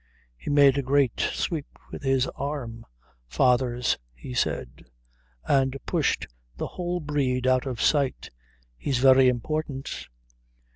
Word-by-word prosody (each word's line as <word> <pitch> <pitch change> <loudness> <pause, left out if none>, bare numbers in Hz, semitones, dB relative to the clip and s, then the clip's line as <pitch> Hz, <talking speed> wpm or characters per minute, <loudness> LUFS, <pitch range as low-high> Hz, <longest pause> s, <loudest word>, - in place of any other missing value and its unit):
He - - -7
made 140 -1 +5
a - - +1
great 135 -2 +1
sweep 160 -5 -2
with - - -7
his 135 -1 +2
arm. 125 -5 -5 0.4
"Fathers," 125 - +2 0.2
he 60 +1 -9
said; 60 - -2 0.6
and 135 0 +2
pushed - - 0 0.3
the - - -2
whole 175 0 -3
breed 140 -5 -1
out 130 +1 +2
of 125 -3 -4
sight. 140 -4 +1 0.5
"He's 135 - 0
very 130 0 +6
important." 135 +2 -2
135 Hz, 125 wpm, -26 LUFS, 125-145 Hz, 0.6 s, very